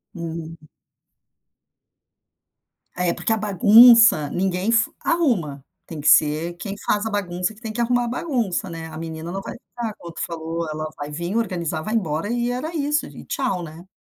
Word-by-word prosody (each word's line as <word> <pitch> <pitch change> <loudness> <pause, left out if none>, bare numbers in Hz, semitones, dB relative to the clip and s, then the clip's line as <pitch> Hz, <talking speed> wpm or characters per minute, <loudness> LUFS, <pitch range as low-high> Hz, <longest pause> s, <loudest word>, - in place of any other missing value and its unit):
Hum. 165 -1 -6 2.4
É, 180 -1 0
porque - - -3
a - - 0
bagunça, 215 - +7
ninguém 190 +3 -1
f 230 0 +2
arruma, 185 - 0 0.2
tem 155 -3 -7
que 150 - -2
ser 155 +3 +4
quem 200 +1 -5
faz 210 +1 +1
a - - -1
bagunça, 180 0 -2
que 215 - -20
tem 220 -2 -5
que 230 - -6
arrumar 245 0 +1
a - - -3
bagunça, 235 - -2
né, 165 -1 -7
a 155 -1 -9
menina 160 +1 -6
não 195 +1 -4
vai, - - -7 0.2
a 225 -3 -3
outra 170 -1 -8
falou: 165 0 -4
"Ela 155 0 -4
vai 145 0 -6
vim, 170 +7 -4
organizar 170 -8 -1
vai 215 +6 -4
embora," 165 -1 -1
e 240 0 0
era 310 +7 -4
isso 295 0 0
e - - -11
tchau, 220 -10 -2
né. 165 +3 -11
185 Hz, 175 wpm, -22 LUFS, 165-230 Hz, 2.4 s, bagunça